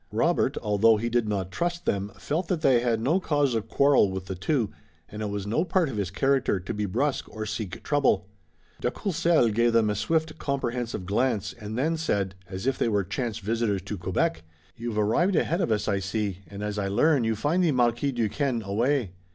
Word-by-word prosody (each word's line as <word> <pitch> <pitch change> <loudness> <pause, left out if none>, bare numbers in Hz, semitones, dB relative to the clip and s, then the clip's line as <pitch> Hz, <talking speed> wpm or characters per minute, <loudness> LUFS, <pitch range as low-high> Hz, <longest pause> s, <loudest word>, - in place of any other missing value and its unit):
Robert, - - +1
although 105 +2 +4
he 115 +3 -2
did 120 -2 +1
not 95 -3 -2
trust 170 - -2
them, 100 +1 -1
felt 165 +4 -2
that 175 -3 -1
they 130 -4 +5
had 120 -2 +1
no 145 +11 +2
cause 145 -7 +1
of 110 -2 -2
quarrel 140 -7 +4
with 95 -1 -5
the 95 - -4
two, 110 - 0 0.4
and 105 - -8
it 105 - -2
was 100 -1 -3
no 115 +10 +1
part 180 -3 +1
of 115 - -5
his 100 -3 -1
character 130 0 +1
to 90 - -5
be 105 0 -2
brusque 135 +9 -1
or 110 0 -5
seek 105 -3 -5
trouble. 140 -10 +2 0.5
De - - 0
Courcelles 165 - +2
gave 120 +2 +2
them 110 -2 +3
a - - -2
swift, 155 +9 -1
comprehensive 120 -7 -2
glance, 110 +1 0
and 110 0 -7
then 160 +5 +1
said, 100 -12 -1 0.2
as 95 +3 -5
if 135 0 0
they - - +2
were 100 -2 +1
chance 115 +4 -3
visitors 110 -2 -1
to 95 +2 -4
Quebec: 90 -3 -1 0.3
"You've 115 -2 -4
arrived 140 - +2
ahead 170 +3 +1
of 170 - 0
us, 105 -1 0
I 100 -2 +1
see, 100 -1 -2
and 100 0 -7
as 105 0 -2
I 100 - -1
learn, 125 +7 +3
you 110 0 +1
find 150 - +1
the 165 - +3
Marquis 120 +1 +2
Duquesne 120 +1 -1
away. 115 +2 0
115 Hz, 210 wpm, -26 LUFS, 105-140 Hz, 0.5 s, they